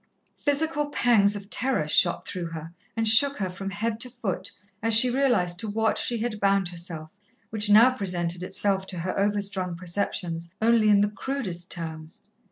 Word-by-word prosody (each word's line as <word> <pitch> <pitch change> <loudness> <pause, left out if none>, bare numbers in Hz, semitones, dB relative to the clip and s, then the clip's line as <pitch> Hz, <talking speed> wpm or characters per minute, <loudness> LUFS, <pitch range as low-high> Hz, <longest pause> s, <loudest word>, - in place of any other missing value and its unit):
Physical 295 +1 0
pangs 220 -7 +3
of 200 0 -9
terror 255 - 0
shot 175 +3 +3
through 180 -3 -5
her 165 0 -8 0.2
and 225 0 +1
shook 275 +6 +5
her 190 -3 -3
from 195 +2 -6
head 220 +3 -3
to 250 - -2
foot 230 -7 -4 0.3
as 225 0 +2
she 245 +3 +6
realized 235 -10 +1
to 220 - -3
what 220 +1 0
she 240 - 0
had 220 -1 -3
bound 195 -2 +2
herself, 170 -3 -5 0.4
which 210 -1 +2
now 225 +5 +7
presented 180 -6 -1
itself 190 +1 0
to 185 - -4
her 185 +2 -3
overstrung 200 -3 -1
perceptions 170 -1 -4
only 225 -1 +3
in 205 -1 +5
the 205 0 +1
crudest 200 -8 -5
terms. 160 -2 -6
200 Hz, 175 wpm, -25 LUFS, 180-225 Hz, 0.4 s, now